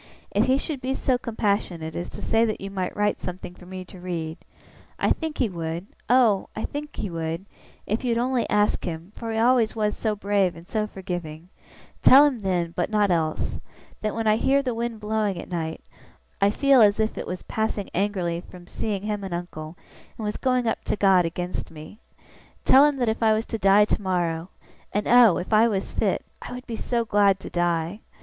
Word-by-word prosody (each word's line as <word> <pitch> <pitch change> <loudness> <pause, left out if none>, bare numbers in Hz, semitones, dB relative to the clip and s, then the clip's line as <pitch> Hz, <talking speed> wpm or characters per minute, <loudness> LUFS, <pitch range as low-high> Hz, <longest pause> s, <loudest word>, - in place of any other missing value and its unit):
If - - +2
he 260 +1 +3
should 280 -1 -4
be 265 +1 -1
so 255 -2 +1
compassionate 200 -8 -2
as 175 +1 -4
to - - -9
say 225 +1 +3
that 215 - -2
you 195 0 -6
might 185 -2 -3
write 205 0 +1
something 180 0 -6
for 180 - -15
me 185 0 -7
to 180 - -13
read 165 -3 -4 0.6
I - - +1
think 320 -2 -1
he 250 - +2
would, 170 -1 -4 0.2
oh, 235 -6 +4
I 220 - -3
think 295 +1 -6
he 195 - -4
would, 165 +2 -3 0.4
if 215 +5 -2
you 250 - 0
would - - 0
only 245 0 0
ask 210 0 +2
him, 170 +1 -5
for 230 -1 -5
he 220 - -2
always 235 -1 +3
was 210 -1 0
so 215 -2 -1
brave 200 -3 +1
and 165 +1 -13
so 215 0 -1
forgiving 175 -4 -6 0.5
tell 275 +3 +8
him 275 -5 0
then 180 -4 -1
(but 175 - 0
not 210 -2 +2
else), 160 -2 -1 0.4
that 215 -1 -2
when 225 0 -2
I 215 0 +4
hear 275 +4 +2
the 250 -2 -1
wind 230 -1 -3
blowing 210 -3 -1
at - - -9
night, 160 -2 -3 0.6
I 200 - +5
feel 270 +3 +4
as 205 -1 +5
if 220 0 0
it - - -5
was 180 - -5
passing 220 -2 -2
angrily 180 -3 -1
from 180 0 -13
seeing 200 +2 -3
him 210 -1 -3
and 190 -3 -3
uncle, 170 -2 -7 0.4
and 220 - -5
was 210 - -2
going 255 -2 +1
up 225 - -1
to - - 0
God 190 -3 +4
against 180 +2 -4
me. 155 +7 -11 0.7
Tell 270 +2 +7
him 295 -1 +2
that 245 -3 +1
if 220 - -2
I 220 -1 +5
was 220 +1 0
to 225 - -4
die 195 +1 +6
tomorrow 175 -4 -1 0.4
(and 205 - -1
oh, 235 -7 +7
if 185 - -4
I 220 +2 +6
was 195 -4 -2
fit, - - 0 0.2
I - - -7
would 250 +1 -8
be 235 - -5
so 235 +1 -1
glad 200 -3 +3
to - - -8
die!) 175 +2 0
205 Hz, 215 wpm, -25 LUFS, 175-225 Hz, 0.7 s, tell